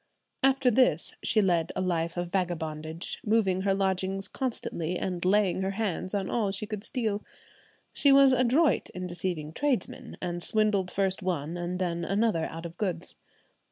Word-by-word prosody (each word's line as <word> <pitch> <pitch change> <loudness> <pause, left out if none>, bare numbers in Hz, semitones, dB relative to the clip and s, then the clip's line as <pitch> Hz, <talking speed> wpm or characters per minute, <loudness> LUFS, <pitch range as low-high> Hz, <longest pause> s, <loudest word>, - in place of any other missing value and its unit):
After 270 -2 +4
this 255 +3 +2
she 215 - +2
led 170 -3 +1
a - - -1
life 170 -2 -1
of 175 0 -3
vagabondage, 160 -3 -3
moving 205 -4 +2
her 195 0 +2
lodgings 195 0 -1
constantly, 180 - -3
and 180 -2 -3
laying 190 -1 +2
her 190 - 0
hands 195 -2 -2
on 195 -2 -1
all 215 -2 0
she 200 +2 -3
could 210 -1 -5
steal. 220 -4 -1 0.7
She 285 - +4
was 275 -1 +7
adroit 255 +5 +3
in 185 0 -4
deceiving 175 -3 -4
tradesmen, 275 - -2
and 175 -1 -3
swindled 210 -2 +2
first 190 +1 0
one 170 -3 -2
and 175 +1 -3
then 170 -2 -1
another 195 -3 +1
out 165 +1 -8
of 170 +1 -8
goods. 180 -5 -3
190 Hz, 160 wpm, -28 LUFS, 175-215 Hz, 0.7 s, was